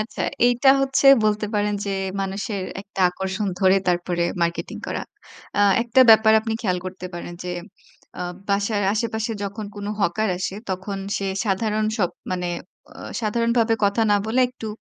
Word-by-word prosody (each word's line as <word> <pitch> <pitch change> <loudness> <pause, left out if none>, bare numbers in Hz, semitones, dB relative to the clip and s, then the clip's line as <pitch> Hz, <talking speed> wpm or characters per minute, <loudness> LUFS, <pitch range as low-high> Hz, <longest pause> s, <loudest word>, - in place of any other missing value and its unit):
আচ্ছা, 215 - -4 0.2
এইটা 245 +2 +3
হচ্ছে 270 0 +2 0.2
বলতে 210 0 +1
পারেন 210 0 +1
যে - - -1 0.3
মানুষের 195 +1 -3 0.2
একটা 200 -1 -8
আকর্ষণ 190 +3 -3
ধরে 190 0 +5
তারপরে 175 -1 0 0.2
মার্কেটিং 170 0 -2
করা। - - -3 0.6
আ - - +4 0.2
একটা 240 +2 +3
ব্যাপার 220 0 +7
আপনি 225 0 -3
খেয়াল 185 -4 0
করতে 185 0 -6
পারেন, 175 0 -6
যে 180 - -3 0.7
আ - - -1 0.3
বাসার 205 +1 +1
আশেপাশে 220 0 -2
যখন 205 +2 -5
কোনো 205 0 -4
হকার 200 +4 +1
আসে, 190 +1 -3
তখন 190 +2 -4 0.2
সে 195 - -3 0.2
সাধারণ 215 +2 0
সব 180 -4 +1 0.2
মানে 180 -1 -2 0.4
অ - - -16 0.3
সাধারণ 230 +2 0
ভাবে 225 0 +3
কথা 200 +3 +2
না 205 - +5
বলে 235 +4 +1
একটু 245 -3 -9
205 Hz, 160 wpm, -23 LUFS, 190-220 Hz, 0.7 s, ব্যাপার